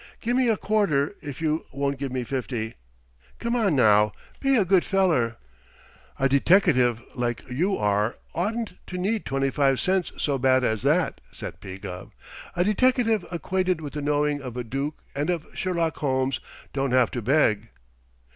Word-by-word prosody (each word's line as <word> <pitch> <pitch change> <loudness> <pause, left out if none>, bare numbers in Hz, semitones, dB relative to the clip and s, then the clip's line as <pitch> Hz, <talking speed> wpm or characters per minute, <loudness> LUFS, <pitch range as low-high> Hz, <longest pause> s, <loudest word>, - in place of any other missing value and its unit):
Gimme 245 +2 +1
a 225 -2 +3
quarter 200 -8 +1
if 145 +1 -7
you 155 0 0
won't 140 0 -2
give 135 -2 -3
me 130 -1 -2
fifty. 120 -3 -3 0.6
Come 235 +1 -1
on, 205 -9 +2
now, 105 -4 +5 0.3
be 275 -1 +3
a 205 - +3
good 185 -1 +4
feller." 165 -13 +2 0.8
"A 135 - +3
deteckative 135 - +4
like 120 -2 -3
you 180 +10 +1
are 105 +2 +1 0.2
oughtn't 215 +2 -2
to 180 - -5
need 205 +4 -1
twenty 135 0 0
five 135 -2 +2
cents 185 -1 +1
so 140 -2 0
bad 130 0 +3
as 110 -3 0
that," 155 +7 +1
said - - -8
P. 95 -1 -8
Gubb. 95 -2 -8 0.4
"A 175 - +2
deteckative 225 0 +2
acquainted 185 +1 -1
with 150 -3 -7
the 150 - -3
knowing 145 0 +1
of 125 -2 -7
a 125 - -2
Dook 135 +6 -4
and 145 +4 -1
of 170 -3 -1
Sherlock 170 -4 -1
Holmes 130 -2 0 0.3
don't 135 -2 0
have 130 -2 +4
to 120 - -3
beg." 120 -3 +2
145 Hz, 165 wpm, -25 LUFS, 125-185 Hz, 0.8 s, now